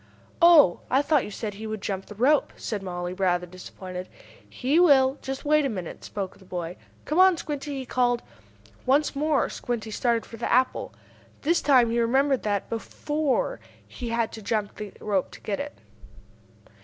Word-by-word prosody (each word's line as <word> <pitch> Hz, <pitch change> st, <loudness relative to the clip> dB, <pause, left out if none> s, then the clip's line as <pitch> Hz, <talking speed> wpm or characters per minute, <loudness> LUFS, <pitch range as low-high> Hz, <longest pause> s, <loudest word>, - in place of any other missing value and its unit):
"Oh, 330 Hz, -, +7 dB
I 270 Hz, +3 st, +3 dB
thought 295 Hz, -1 st, +2 dB
you -, -, -7 dB
said 210 Hz, 0 st, -5 dB
he 215 Hz, +2 st, -7 dB
would 215 Hz, 0 st, -4 dB
jump 195 Hz, -1 st, -4 dB
the 210 Hz, -, -10 dB
rope!" 270 Hz, +7 st, +3 dB
said 210 Hz, -3 st, -4 dB
Mollie, 175 Hz, -1 st, -4 dB
rather 180 Hz, -2 st, +1 dB
disappointed. 185 Hz, +1 st, -8 dB, 0.4 s
"He 280 Hz, +6 st, +1 dB
will 275 Hz, -5 st, +5 dB
just 270 Hz, +1 st, -5 dB
wait 305 Hz, 0 st, +4 dB
a 275 Hz, -, 0 dB
minute," 185 Hz, -7 st, -6 dB
spoke 195 Hz, -3 st, -5 dB
the -, -, -16 dB
boy. 175 Hz, -2 st, -5 dB, 0.3 s
"Come 310 Hz, +4 st, 0 dB
on, 375 Hz, -2 st, +6 dB
Squinty!" 290 Hz, -2 st, -4 dB
he 265 Hz, -, -5 dB
called. 245 Hz, -1 st, +1 dB, 0.6 s
Once 285 Hz, +3 st, +3 dB
more 300 Hz, 0 st, +2 dB
Squinty 230 Hz, -2 st, -4 dB
started 235 Hz, 0 st, 0 dB
for 230 Hz, -, -10 dB
the 235 Hz, -, -3 dB
apple. 255 Hz, +1 st, +2 dB, 0.5 s
This 335 Hz, +4 st, +2 dB
time 250 Hz, -5 st, +4 dB
he 235 Hz, -, +1 dB
remembered 265 Hz, +3 st, +2 dB
that, 205 Hz, -2 st, -1 dB
before, 285 Hz, -, -1 dB, 0.3 s
he 230 Hz, -, -6 dB
had 230 Hz, -1 st, 0 dB
to 220 Hz, -, -8 dB
jump 210 Hz, -1 st, -2 dB
the 210 Hz, -2 st, -6 dB
rope 200 Hz, -3 st, 0 dB
to -, -, -12 dB
get 200 Hz, -2 st, -3 dB
it. 290 Hz, +1 st, -6 dB
235 Hz, 180 wpm, -26 LUFS, 200-280 Hz, 0.6 s, Oh